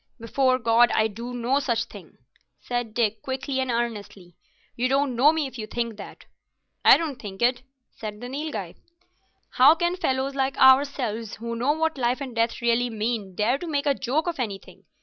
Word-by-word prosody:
"Before 255 +3 +1
God 235 0 +4
I 220 - +3
do 230 +3 -7
no 245 +3 +1
such 235 -5 0
thing," - - -14 0.4
said 245 -2 -4
Dick, 220 -2 0
quickly 265 0 -3
and 260 -1 -1
earnestly. 210 -7 -4 0.4
"You 250 +2 0
don't 275 -1 +1
know 275 +6 +5
me 320 -2 -1
if 260 -2 -8
you 215 - -5
think 235 -1 -3
that." 200 - -11 0.6
I - - +8
don't 310 -6 -4
think 200 +1 -6
it," 245 +1 +2 0.3
said 210 -1 -7
the 245 - -7
Nilghai. 260 - -5 0.8
"How 275 +5 +6
can 345 +2 0
fellows 270 -6 -1
like 270 0 -1
ourselves, 260 -5 +3
who 235 +1 -5
know 250 +6 +1
what 320 -2 -1
life 245 +2 0
and 270 -3 -6
death 230 +1 -1
really 235 +1 +2
mean, 215 -3 -3
dare 235 +7 +1
to 350 - -6
make 290 -2 -1
a 285 - +3
joke 270 +4 -1
of 345 -5 -3
anything? 205 -6 -6
245 Hz, 190 wpm, -25 LUFS, 230-275 Hz, 0.8 s, I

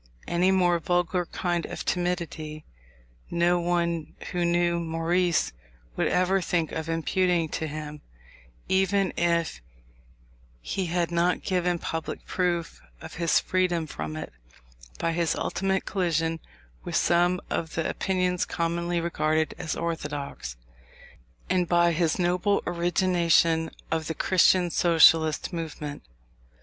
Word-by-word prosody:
Any 175 +2 +2
more 180 -2 +3
vulgar 175 +1 0
kind 175 -2 -2
of - - -6
timidity 170 -4 -2 0.6
no 175 +1 +2
one 170 -2 -1 0.2
who 175 -1 0
knew 170 0 +2
Maurice 170 - 0 0.4
would - - +1
ever 185 +1 +2
think 170 -2 -1
of 160 0 -4
imputing 170 0 +1
to 160 - -3
him, 150 0 -7 0.7
even 190 0 +2
if 170 - 0 1.0
he 180 - -3
had 170 0 0
not 170 +1 +1
given 180 -1 0
public 165 -1 -5
proof 175 -2 -1 0.2
of 160 - -10
his 170 - +4
freedom 180 -3 0
from 80 - -6
it, 80 - -6 0.6
by 165 - 0
his 165 0 0
ultimate 190 0 -1
collision 165 -3 0 0.4
with - - -4
some 175 +1 +3
of 160 -1 -2
the 165 - 0
opinions 180 -2 0
commonly 170 +1 -1
regarded 160 -2 0
as 160 -4 -3
orthodox, 145 - -4 0.9
and 180 -1 +1
by 170 0 +4
his 165 -1 +1
noble 180 +3 +1
origination 170 -2 +2 0.2
of 160 -1 -1
the 160 - -3
Christian 185 -1 +3
Socialist 165 -1 +4
movement. 155 -3 -5
170 Hz, 120 wpm, -26 LUFS, 160-180 Hz, 1.0 s, his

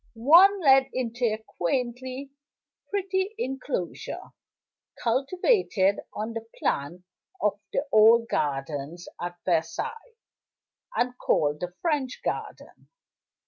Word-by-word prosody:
One 345 - +6
led 270 -3 +5
into 245 -1 -1
a 215 -2 +1
quaintly 255 +6 -3 0.6
pretty 390 +1 -1
inclosure, 265 - -4 0.7
cultivated 260 - +2
on 220 +2 -4
the 225 0 -6
plan 155 +6 -2 0.4
of 210 -1 0
the 285 - -1
old 225 +2 +6
gardens 145 +3 -3
at 175 0 -4
Versailles, 180 - -2 0.8
and 250 0 0
called 150 0 +1
the 180 0 -5
French 290 -6 -1
Garden. - - -5
235 Hz, 100 wpm, -26 LUFS, 180-275 Hz, 0.8 s, One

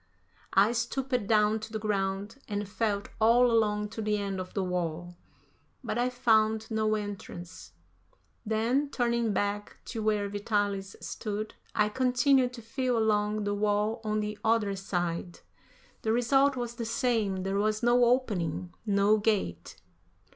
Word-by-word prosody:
I 200 +3 +5
stooped 245 -1 -1
down 215 0 +3
to 220 0 -8
the 220 - -2
ground 205 +3 -2
and 205 -1 -3
felt 205 -1 -1
all 235 +2 +5
along 210 -2 +1
to 225 +1 -6
the 210 0 0
end 200 -2 -3
of 185 0 -7
the 195 - 0
wall, 175 -1 -3 0.7
but - - -2
I 245 +1 +2
found 220 -2 +2
no 215 0 +1
entrance; 185 - -7 0.7
then, 230 +7 +1
turning 235 -3 0
back 205 +1 -2
to 225 - -5
where 210 -1 +1
Vitalis 205 -1 -1
stood, 215 0 -4 0.2
I 210 - +3
continued 255 +2 +3
to 235 -2 -9
feel 250 +1 -1
along 210 -1 +1
the 205 0 -1
wall 210 +2 0
on 215 0 0
the 210 0 -4
other 220 -3 +2
side. 175 -2 -3 0.6
The 220 - 0
result 270 +4 +3
was 240 -2 -3
the 235 -1 -5
same; 225 -5 0
there 195 +1 -1
was 215 +2 0
no 240 +1 +5
opening, 185 -9 0
no 205 +1 +4
gate. 195 - -1
215 Hz, 145 wpm, -29 LUFS, 200-230 Hz, 0.7 s, I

